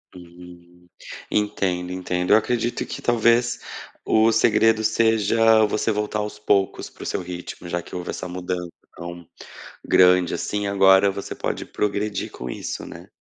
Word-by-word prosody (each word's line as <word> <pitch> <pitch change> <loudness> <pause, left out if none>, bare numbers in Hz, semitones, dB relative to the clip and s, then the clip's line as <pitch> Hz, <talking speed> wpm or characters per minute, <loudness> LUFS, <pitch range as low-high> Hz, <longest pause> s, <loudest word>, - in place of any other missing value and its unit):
Hum. 90 0 -15 0.4
Entendo, 95 -4 -1
entendo. 90 0 -2
Eu 105 - +8
acredito 120 +1 -1
que, - - -7
talvez, 120 0 +2 0.5
o 110 +1 +4
segredo 110 0 +3
seja 110 0 +3
você 105 +2 -1
voltar 105 0 -2
aos 105 0 -5
poucos 100 -2 0
para - - -12
o - - -8
seu - - -2
ritmo 90 0 -8
já 85 0 -2
que - - -11
houve 90 - -5
essa 90 - -6
mudança 90 0 -4 0.3
tão 85 0 -9 0.6
grande 90 -1 +4
assim 105 0 -3
agora 95 0 +5
você 100 0 -7
pode - - -4
progredir 105 0 -2
com 60 - -7
isso, - - -5
né? - - -11
100 Hz, 150 wpm, -23 LUFS, 90-110 Hz, 0.6 s, Eu